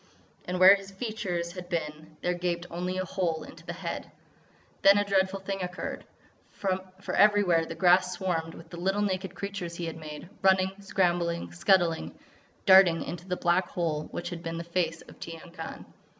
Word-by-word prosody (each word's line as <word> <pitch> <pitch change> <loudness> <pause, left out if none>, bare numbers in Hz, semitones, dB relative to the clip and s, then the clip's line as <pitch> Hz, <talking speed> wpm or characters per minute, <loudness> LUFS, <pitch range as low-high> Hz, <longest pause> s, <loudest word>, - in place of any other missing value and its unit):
And 180 0 -3
where 185 +1 +10
his 195 -1 -3
features 195 -5 -3
had 180 0 -9
been 155 -1 -4
there 180 - +1
gaped 175 -1 -2
only 180 +2 -3
a 185 - -1
hole 175 -3 -1
into - - -12
the - - -5
head. - - -5 0.7
Then 195 +1 +7
a 205 - +2
dreadful 195 -1 +1
thing 195 0 -4
occurred; 180 +1 -5 0.4
for 190 0 -4
everywhere 200 -6 +4
the 165 - -6
grass 180 +1 +4
swarmed 170 -3 -2
with 165 - -13
the 175 - -7
little 195 +3 +1
naked 190 -1 -2
creatures 200 -4 -5
he 170 - -4
had 165 -1 -5
made, 155 0 -8
running, 190 0 +4
scrambling, 175 -3 0
scuttling, 175 -2 +2 0.5
darting 190 -4 +7
into 175 +1 -7
the 180 -1 -1
black 175 +2 +2
hole 160 -3 -2
which 175 +1 -5
had 170 -1 -6
been 165 0 -4
the 170 - -4
face 170 -1 -1
of - - -16
Tiyang 165 +1 -9
Khan. 165 -2 -7
180 Hz, 180 wpm, -28 LUFS, 170-190 Hz, 0.7 s, where